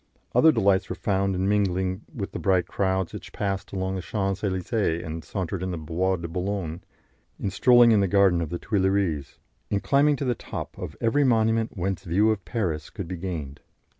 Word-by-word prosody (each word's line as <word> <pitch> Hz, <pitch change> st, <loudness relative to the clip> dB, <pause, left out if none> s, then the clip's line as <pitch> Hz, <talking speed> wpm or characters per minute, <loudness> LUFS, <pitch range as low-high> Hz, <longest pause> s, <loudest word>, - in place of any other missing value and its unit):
Other 160 Hz, -, +6 dB
delights 100 Hz, -7 st, +2 dB
were -, -, -3 dB
found 95 Hz, -1 st, 0 dB
in 95 Hz, +1 st, 0 dB
mingling 95 Hz, -2 st, +1 dB
with 100 Hz, -4 st, -5 dB
the -, -, -5 dB
bright 95 Hz, -3 st, +2 dB
crowds 95 Hz, -2 st, -1 dB
which -, -, -8 dB
passed 100 Hz, -1 st, -3 dB
along 95 Hz, -1 st, -2 dB
the 95 Hz, -, -3 dB
Champs 95 Hz, +2 st, -2 dB
Elysees 95 Hz, -2 st, 0 dB
and 80 Hz, -1 st, -6 dB
sauntered 95 Hz, -2 st, -4 dB
in 95 Hz, -, -2 dB
the 90 Hz, -, -3 dB
Bois 85 Hz, +4 st, 0 dB
de 85 Hz, -1 st, -5 dB
Boulogne, 90 Hz, -1 st, -3 dB, 0.6 s
in 100 Hz, -, -2 dB
strolling 120 Hz, +3 st, +6 dB
in 110 Hz, -, +5 dB
the 100 Hz, -, +2 dB
garden 95 Hz, -3 st, +4 dB
of 80 Hz, -, -3 dB
the 85 Hz, -, -3 dB
Tuileries, 95 Hz, -, 0 dB, 0.3 s
in 100 Hz, -, +1 dB
climbing 145 Hz, +5 st, +3 dB
to 140 Hz, -, -3 dB
the 125 Hz, -, +2 dB
top -, -, -7 dB
of -, -, -7 dB
every 130 Hz, +6 st, +2 dB
monument 115 Hz, -3 st, +2 dB
whence 95 Hz, +1 st, -2 dB
view 100 Hz, +6 st, +3 dB
of 100 Hz, -4 st, -2 dB
Paris 90 Hz, -10 st, -2 dB
could 100 Hz, -6 st, -6 dB
be 90 Hz, -, -4 dB
gained. 80 Hz, -6 st, -5 dB
95 Hz, 195 wpm, -25 LUFS, 90-105 Hz, 0.6 s, Other